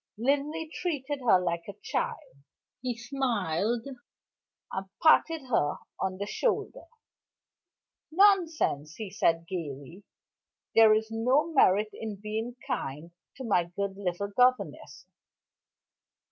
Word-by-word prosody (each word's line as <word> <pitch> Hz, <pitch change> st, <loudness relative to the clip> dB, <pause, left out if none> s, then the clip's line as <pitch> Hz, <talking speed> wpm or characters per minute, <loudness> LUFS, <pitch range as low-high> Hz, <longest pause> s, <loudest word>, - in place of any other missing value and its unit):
Linley 290 Hz, +6 st, 0 dB
treated 295 Hz, -4 st, -3 dB
her 185 Hz, -, +7 dB
like 170 Hz, -2 st, -2 dB
a -, -, -7 dB
child; -, -, -3 dB, 0.5 s
he 245 Hz, -2 st, -3 dB
smiled, 230 Hz, -, -1 dB, 0.9 s
and 190 Hz, 0 st, -4 dB, 0.2 s
patted 320 Hz, -1 st, +5 dB
her 220 Hz, -, +1 dB, 0.2 s
on 185 Hz, -1 st, -2 dB
the 200 Hz, -, -3 dB
shoulder. 485 Hz, -, -2 dB, 1.3 s
"Nonsense!" 330 Hz, -, +3 dB
he 215 Hz, -4 st, -6 dB
said 165 Hz, -4 st, +1 dB
gayly. 165 Hz, -1 st, -6 dB, 0.7 s
"There 220 Hz, -1 st, +7 dB
is 220 Hz, +1 st, -2 dB
no 255 Hz, +9 st, +1 dB
merit 210 Hz, -6 st, +4 dB
in 220 Hz, -2 st, -5 dB
being 215 Hz, +4 st, -4 dB
kind 170 Hz, -, -4 dB, 0.2 s
to 265 Hz, -, -8 dB
my 195 Hz, -7 st, +2 dB
good 195 Hz, +3 st, -4 dB
little 195 Hz, 0 st, -3 dB
governess." 250 Hz, +4 st, +1 dB
220 Hz, 110 wpm, -29 LUFS, 185-270 Hz, 1.3 s, her